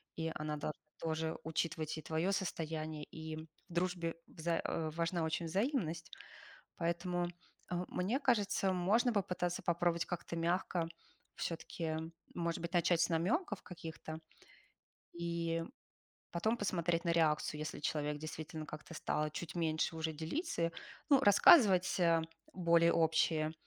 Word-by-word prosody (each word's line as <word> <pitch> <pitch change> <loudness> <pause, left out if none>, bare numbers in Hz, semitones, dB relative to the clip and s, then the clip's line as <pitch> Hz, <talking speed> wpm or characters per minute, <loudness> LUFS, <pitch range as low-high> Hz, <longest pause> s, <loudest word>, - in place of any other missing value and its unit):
и 160 0 -2
она 150 0 -2
до 150 - -2 0.3
тоже 160 0 -1
учитывать 160 -1 -1
и - - -7
твоё 160 +5 0
состояние, 160 -5 -2
и 160 0 -6
в 160 - -8 0.2
дружбе 175 -1 -1
вза 165 +1 -1
э, 160 -1 -1
важна 170 0 0
очень 165 +1 -1
взаимность. 170 - -1 0.7
Поэтому, 175 +1 0 0.4
а, 180 0 -1
мне 215 +10 0
кажется, 205 -6 +2
можно 210 +7 +3
попытаться 180 -3 -1
попробовать 170 0 +1
как-то 170 -1 -4
мягко, 170 0 0 0.5
всё-таки, 165 -1 -3 0.4
может 170 -1 -1
быть, 170 +1 -4
начать 175 -1 +3
с 170 - +4
намёков 205 - 0
каких-то, 160 -2 -7 1.0
и 170 -1 -1 0.7
потом 220 +7 +1
посмотреть 175 -4 0
на 170 - +3
реакцию, 155 -2 +2
если 155 -1 -4
человек 150 0 -1
действительно 155 0 -6
как-то 155 - -8
стал 150 0 0
чуть 170 +1 -5
меньше, 160 -1 0
уже 160 0 -2
делиться. 165 - -1 0.4
Ну, 280 -2 +7
рассказывать, 195 - +7
а, 165 -2 +4 0.3
более 170 -2 +4
общие, 160 -1 +3
170 Hz, 130 wpm, -36 LUFS, 160-180 Hz, 1.0 s, Ну